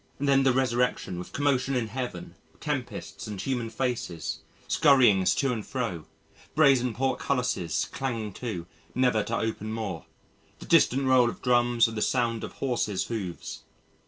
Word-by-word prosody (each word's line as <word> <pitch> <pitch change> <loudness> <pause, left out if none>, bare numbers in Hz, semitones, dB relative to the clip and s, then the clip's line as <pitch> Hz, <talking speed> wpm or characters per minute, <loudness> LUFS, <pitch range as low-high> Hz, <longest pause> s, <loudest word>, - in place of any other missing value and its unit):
Then 140 -1 +3
the 135 -1 +4
resurrection 125 -7 0
with 90 - -8
commotion 135 -2 +1
in 125 -2 +1
Heaven: 125 +2 -5 0.3
tempests - - -4
and 105 -3 -6
human 120 +3 -2
faces, 115 - -3 0.3
scurryings 115 - +5
to 135 -3 +1
and 110 -3 -4
fro, 110 - -4 0.5
brazen 135 -6 +4
portcullises 125 - 0
clanging 115 -6 -3
to, 100 -7 -5 0.3
never 125 -3 +3
to 115 +3 -2
open 110 -1 -3
more, 105 -7 -4 0.5
the - - -11
distant 135 +3 +4
roll 130 -2 +5
of - - -9
drums 120 -1 +4
and 115 - -6
the 105 - -2
sound 115 -2 0
of - - -6
horses' 110 -7 -1
hoofs. 100 -7 -5
120 Hz, 145 wpm, -27 LUFS, 105-130 Hz, 0.5 s, scurryings